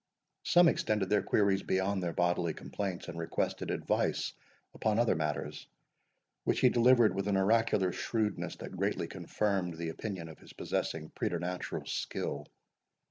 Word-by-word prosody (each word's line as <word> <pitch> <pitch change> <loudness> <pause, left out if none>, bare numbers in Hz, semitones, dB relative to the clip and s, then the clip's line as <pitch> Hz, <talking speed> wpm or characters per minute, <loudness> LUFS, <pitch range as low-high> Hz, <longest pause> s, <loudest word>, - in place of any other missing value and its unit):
Some 175 0 +6
extended 105 - +1
their 105 - +4
queries 100 -2 +2
beyond 95 +1 0
their 85 -1 -1
bodily 85 -1 +1
complaints, 95 -4 -4
and 85 - -6
requested 85 - -2
advice - - 0 0.4
upon 110 -1 0
other 120 -1 +4
matters, 75 -3 -3 0.8
which - - +1
he 125 - +7
delivered 120 -1 +5
with 100 0 -2
an 100 -1 +2
oracular 105 -1 +3
shrewdness 110 +3 -2
that - - -8
greatly - - 0
confirmed 95 -5 -1
the 85 0 -3
opinion 90 -1 -5
of 80 - -11
his - - -14
possessing - - -3
preternatural 90 +1 -3
skill. 75 +1 -3
95 Hz, 140 wpm, -32 LUFS, 85-110 Hz, 0.8 s, he